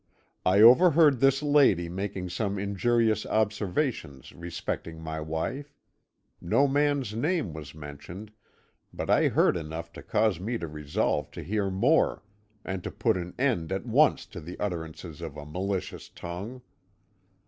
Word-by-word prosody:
I 95 +3 +5
overheard 145 +3 +7
this 135 +2 +3
lady 140 - +4
making 95 +1 -4
some 100 +2 -2
injurious 110 +2 +1
observations 105 - -1
respecting 85 -1 -5
my 80 -1 -5
wife; 105 - -4 0.7
no 135 +11 +3
man's 140 -5 +1
name 145 - -1
was 75 -2 -9
mentioned, 80 +8 -9 0.6
but - - -3
I - - +4
heard - - +3
enough 80 0 -6
to - - -9
cause 110 -6 +1
me 115 +6 -2
to 85 - -5
resolve 75 -1 -1
to - - -7
hear 100 0 -1
more, 120 +13 +2 0.4
and 95 -2 -4
to - - -4
put - - +1
an 90 -1 -5
end 115 - 0
at 95 +3 -2
once 140 +6 +3
to - - -6
the 85 +4 -9
utterances 85 -3 -5
of 80 -3 -7
a 75 - -8
malicious 95 +5 -4
tongue. 100 +9 -7
95 Hz, 145 wpm, -28 LUFS, 85-120 Hz, 0.7 s, overheard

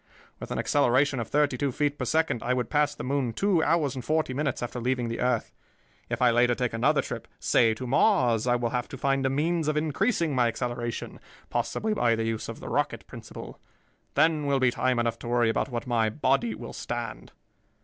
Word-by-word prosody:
With - - -7
an - - -3
acceleration 140 0 +2
of 115 - -3
thirty 145 -1 +1
two 140 -2 0
feet 145 +2 -1
per - - -1
second, 160 -7 +1
I 125 +1 0
would 125 -3 -2
pass 150 -1 +2
the - - -7
moon 130 -3 -1
two 195 - +2
hours 155 -4 +1
and 130 -2 -6
forty 155 -2 0
minutes 140 -1 -2
after 120 +1 -4
leaving 125 0 -1
the 115 - -4
earth. 125 -2 0 0.6
If - - -1
I 125 - +6
later 120 +1 +3
take 125 -2 -2
another 115 - +2
trip, - - -6
say 115 -2 +3
to 125 - -6
Mars, 125 - +3
I 120 - +3
will 120 -1 -1
have 125 -1 -2
to 135 - -8
find 135 +1 +1
a - - +1
means 160 +4 0
of 155 0 +1
increasing 160 - 0
my 125 -2 +3
acceleration, 120 0 -4 0.3
possibly 220 0 -1
by 120 - +2
the 115 - -2
use 115 -1 -3
of - - -8
the - - -8
rocket - - -1
principle. - - -10 0.6
Then 155 0 +3
will 140 -1 +2
be 130 -1 +3
time 130 +1 0
enough 115 -1 0
to - - -8
worry 120 -1 +2
about 125 - -1
what 120 -2 -4
my 115 -3 +1
body 135 - 0
will - - -8
stand." - - -5
130 Hz, 215 wpm, -27 LUFS, 120-150 Hz, 0.6 s, I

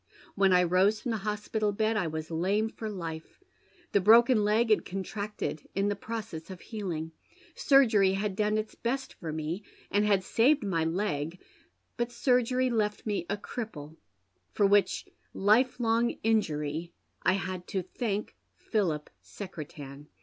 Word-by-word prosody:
When 195 -1 +3
I 180 0 +5
rose 185 +5 +3
from 240 - -3
the 225 - 0
hospital 210 +1 -1
bed 220 +2 0
I 205 -5 +1
was 160 +1 -5
lame 195 +7 +1
for 220 -1 -6
life. 165 - -7 0.5
The 200 - +3
broken 230 +2 +6
leg 220 +2 +2
had 215 - +4
contracted 195 -3 -5
in 200 +1 +1
the 205 - 0
process 200 -6 -6
of 185 -2 -8
healing. 170 -8 -5 0.4
Surgery 225 -9 +4
had 195 0 -1
done 210 +1 +1
its 215 0 -3
best 265 +3 -3
for 165 -3 -6
me, 160 +5 -3 0.3
and 205 +1 +3
had 200 -3 +3
saved 255 +8 +3
my 180 -5 0
leg; 165 -2 -2 0.6
but 240 0 -1
surgery 250 +1 +2
left 210 -2 -1
me 205 -5 -2
a 200 - 0
cripple, 170 -9 -7 0.6
for 205 - +3
which 200 0 +3 0.3
life 225 +7 +3
long 235 0 +1
injury 165 -7 0 0.3
I 185 - +3
had 185 -2 -4
to 190 -3 -2
thank 210 +2 -3 0.2
Philip 170 -9 -1
Secretan. 150 -6 -9
205 Hz, 150 wpm, -29 LUFS, 175-220 Hz, 0.6 s, broken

